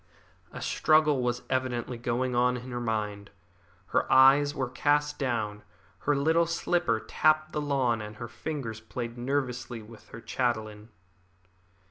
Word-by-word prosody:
A - - -7
struggle 155 -3 +3
was 125 0 -1
evidently 130 -2 -2
going 120 +2 -1
on 125 +1 +2
in 125 +1 -8
her 120 - -3
mind. 105 -3 -3 0.6
Her - - 0
eyes 135 +2 +6
were 130 -3 -1
cast 145 +3 +1
down, 110 -6 -2 0.4
her 145 - +1
little 160 +4 +3
slipper 165 -7 0
tapped 155 +5 +2
the 150 - -2
lawn, 130 -6 +1
and 105 0 -8
her 120 +2 -7
fingers 120 -2 -5
played 115 +1 -6
nervously 125 -2 -3
with 110 +1 -15
her 115 - -9
chatelain. 110 -3 -2
125 Hz, 140 wpm, -28 LUFS, 115-145 Hz, 0.6 s, eyes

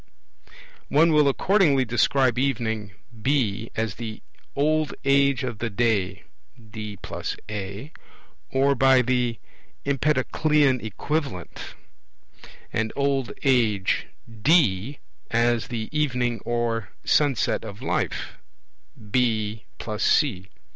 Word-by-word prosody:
One 160 +3 +4
will 150 -2 +5
accordingly 150 -4 +3
describe 125 +1 +2
evening 110 -7 -1 0.3
(B) 115 -4 0
as 110 -3 -1
the 110 0 -7 0.3
'old 155 +2 +1
age 140 -1 +3
of 120 -4 -4
the 120 - -2
day' 100 -4 0 0.4
(D 110 -2 -8 0.3
+ - - -5
A) 105 +7 -6 0.6
or 135 +1 +3
by 130 -1 +5
the 125 -2 0 0.5
Empedoclean 140 0 +2
equivalent; 115 - -4 1.0
and 110 0 0
old 140 -2 0
age 115 -8 +2 0.2
(D) 115 - +2 0.3
as 120 0 +1
the 115 -2 -4
'evening' 125 -6 0
or 115 -3 -1
'sunset 140 -8 +2
of 110 +2 -9
life'' - - -2 0.7
(B 110 -3 0 0.2
+ 105 -1 -3
C). 100 - +2
120 Hz, 100 wpm, -24 LUFS, 110-140 Hz, 1.0 s, will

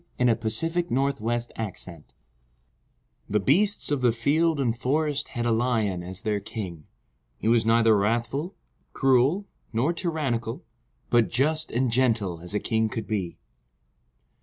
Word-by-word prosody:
The 125 - +2
Kingdom 115 -2 +1 0.6
of 140 0 -1
the 120 +2 -2
Lion 90 -6 -6 1.3
THE 105 - +2
BEASTS 190 - +2
of 145 -3 0
the 125 -2 +4
field 150 +7 +1
and 120 -4 +1
forest 145 +4 0
had 120 -1 -4
a 120 - +2
Lion 110 -6 0
as 90 +2 -7
their 105 -1 0
king. 100 -7 -7 0.5
He 110 - -4
was 115 -1 +3
neither 115 -1 +5
wrathful, 120 - -1 0.4
cruel, 135 +9 +3 0.3
nor 125 +9 +1
tyrannical, 140 -9 -2 0.5
but 120 -2 +4
just 155 +6 0
and 125 +1 0
gentle 115 -8 +1
as 90 +4 -6
a - - +2
king 110 0 0
could 110 0 -4
be. 95 -6 -3
115 Hz, 140 wpm, -26 LUFS, 110-135 Hz, 1.3 s, neither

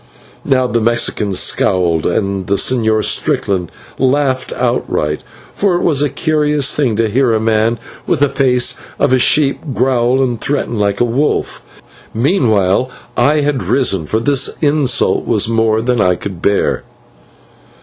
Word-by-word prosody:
Now 130 -1 +1
the 120 -2 -1
Mexican 110 -3 0
scowled, 85 -3 +1
and 100 -3 -2
the 100 - +1
Señor 110 -1 +1
Strickland 90 -4 0 0.3
laughed 130 0 0
outright, 75 0 -1 0.3
for 195 -3 0
it 175 - -1
was 145 -4 +2
a 145 - +1
curious 150 -3 +1
thing 130 -7 0
to 115 +1 +1
hear 120 +2 +1
a 110 - +1
man 110 +1 +1 0.3
with 160 -5 0
the 145 - +5
face 130 -3 +1 0.2
of - - +1
a 130 - +3
sheep 140 +2 +2 0.2
growl 130 0 +1
and 120 -3 -3
threaten 120 -5 -2
like 100 +1 0
a - - +4
wolf. 130 +6 -1 0.5
Meanwhile 115 - +1 0.3
I 150 +1 +2
had 145 -3 -1
risen, 100 - 0
for 110 - 0
this 135 +3 +2
insult 145 -4 +1
was 110 -3 +1
more 110 -1 +1
than 120 -2 0
I 90 -2 +2
could 95 -2 -8
bear. 100 - 0
120 Hz, 150 wpm, -14 LUFS, 110-140 Hz, 0.5 s, the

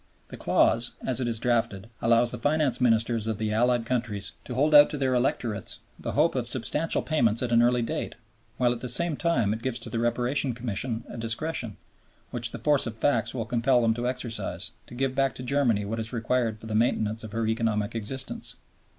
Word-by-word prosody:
The - - -8
clause, 120 +1 +2
as 130 0 +2
it 125 - 0
is 115 -1 -1
drafted, 115 -4 0
allows 115 +1 +4
the 125 - -5
Finance 145 -2 +1
Ministers 115 -2 +2
of 110 -2 -1
the 110 0 -2
Allied 120 +1 +2
countries 115 -5 -2
to 125 - -5
hold 150 +4 +2
out 145 0 +9
to 150 - -4
their 135 -2 +1
electorates 120 -5 -1 0.2
the - - -4
hope - - +3
of - - -2
substantial 165 +2 0
payments 120 -7 +1
at 120 - -2
an 115 0 +5
early 120 0 +3
date, 115 - -3 0.4
while 125 -1 +3
at 120 - -3
the 125 - -3
same 165 +6 +1
time 145 -11 +1
it 110 - -5
gives 130 -1 -2
to 115 -2 -8
the 115 - -1
Reparation 120 +3 0
Commission 115 0 -3
a - - -8
discretion, 115 0 -3 0.5
which 120 -1 -1
the 115 - -7
force 140 +3 +2
of 110 - -5
facts 120 -1 0
will 115 -3 -2
compel 120 +1 +2
them 115 -1 +3
to 120 +2 -2
exercise, 125 -3 -3 0.2
to - - -11
give 135 +1 0
back 135 0 +1
to 125 - -7
Germany 125 -6 +1
what 115 +3 -3
is 110 0 -3
required 115 -1 0
for - - -11
the 110 - -5
maintenance 110 -1 +1
of 110 - -7
her 115 0 -1
economic 110 -1 0
existence. 115 +4 -4
120 Hz, 210 wpm, -27 LUFS, 115-125 Hz, 0.5 s, out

